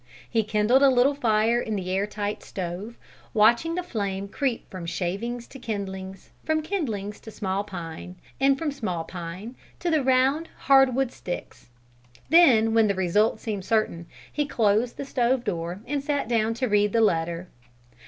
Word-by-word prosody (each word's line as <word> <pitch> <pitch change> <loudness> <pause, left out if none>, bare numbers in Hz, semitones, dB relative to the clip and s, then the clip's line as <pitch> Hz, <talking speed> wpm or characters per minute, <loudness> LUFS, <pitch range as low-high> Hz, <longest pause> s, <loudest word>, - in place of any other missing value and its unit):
He 225 - +1
kindled 215 +5 +3
a 280 - +7
little 260 +2 +4
fire 230 -2 +2
in 220 -2 -3
the 185 -2 -3
air 195 +2 0
tight 205 0 -4
stove, 190 +5 -6 0.4
watching 235 +10 +4
the 360 - -2
flame 200 - -3
creep 255 +2 -2
from 180 -3 -6
shavings 225 +8 -3
to 270 - -11
kindlings, 195 -4 -6
from 315 0 0
kindlings 225 - -3
to - - -10
small 195 -2 -2
pine, 180 -2 -8 0.2
and 270 0 +4
from 305 0 -2
small 185 -12 -3
pine 180 +7 -7 0.2
to 345 - -1
the 315 -2 +3
round, 265 +5 +2
hardwood 270 -2 +4
sticks; 175 - -7 0.6
then 245 -10 +6
when 225 -1 +5
the 200 - +1
result 205 +4 +2
seemed 210 -4 -4
certain, 185 -5 0 0.3
he 295 -1 0
closed 225 -1 +1
the 280 - -4
stove 250 -1 +1
door 175 -3 -3
and 285 0 -2
sat 285 -3 -1
down 225 -1 +1
to 255 +2 -1
read 210 -1 +2
the 230 - +3
letter. 170 -3 +1
220 Hz, 165 wpm, -25 LUFS, 195-260 Hz, 0.6 s, a